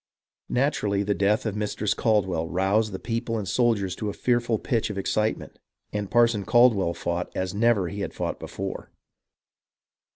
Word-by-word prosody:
Naturally, 105 -7 +1
the 105 0 +1
death 100 +3 +1
of 110 -2 -2
Mistress 105 0 -1
Caldwell 95 -7 +1
roused 100 +4 +1
the 95 - -4
people 115 +2 -3
and 105 -3 -4
soldiers 105 -5 +1
to 105 - -3
a - - -4
fearful 120 -1 +1
pitch 115 +1 -1
of 105 - -5
excitement, 105 +3 -1 0.3
and 105 -2 -3
Parson 115 -2 +3
Caldwell 105 -6 +4
fought 85 +1 -2
as 95 -1 -2
never 105 -3 +2
he 100 +4 -6
had - - -3
fought - - -3
before. - - -6
105 Hz, 160 wpm, -25 LUFS, 95-115 Hz, 0.3 s, Caldwell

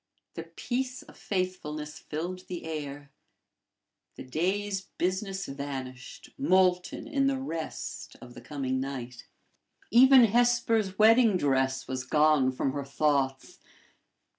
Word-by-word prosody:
The 165 - -7
peace 250 +9 -4
of - - -16
faithfulness 160 -5 -4
filled 180 +5 -6
the 175 -3 -6
air. 145 -3 -6 1.0
The - - -8
day's 190 +8 -1 0.2
business 190 +2 -2
vanished, 135 -2 -7
molten 185 -3 +2
in 275 -2 +1
the 275 -1 +1
rest 165 -12 -6
of 120 - -12
the 120 - -11
coming 130 0 -3
night. 125 -3 -6 0.6
Even 260 +2 +8
Hesper's 230 -3 +2
wedding 225 -1 +5
dress 135 -3 0
was 130 -1 -3
gone 150 -1 +3
from 130 +1 -1
her 140 +1 -4
thoughts. 135 -1 -1
160 Hz, 115 wpm, -28 LUFS, 135-205 Hz, 1.0 s, Even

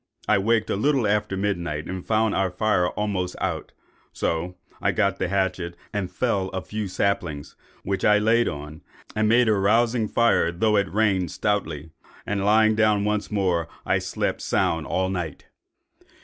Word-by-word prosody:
I 110 -2 +4
waked 110 +2 +1
a - - +1
little 135 +3 +2
after 105 -2 0
midnight 85 -6 -2
and 95 -1 -5
found 110 -1 +1
our 95 -1 +1
fire 90 -1 +1
almost 95 -3 -2
out; - - -3 0.4
so 85 +2 -2 0.3
I - - +2
got 100 -2 0
the - - 0
hatchet 95 -2 -1 0.2
and 100 -3 -2
felled 100 -6 -1
a 95 - -3
few 105 +3 -4
saplings, 90 -6 -2 0.3
which 95 0 -2
I 105 0 +5
laid 115 +3 +3
on, 75 +1 -6 0.3
and 110 0 +2
made 120 +1 +4
a 110 - +4
rousing 110 +3 +2
fire, 115 -8 +2
though 105 +5 +1
it 100 -2 +1
rained 100 -4 +1
stoutly; 80 -6 -2 0.3
and 100 -1 -1
lying 110 +2 +4
down 105 -2 +2
once 105 0 -1
more, 90 -5 0 0.2
I - - +2
slept - - -2
sound 80 -1 0
all 95 0 0
night. 85 -5 -4
100 Hz, 165 wpm, -24 LUFS, 90-110 Hz, 0.4 s, I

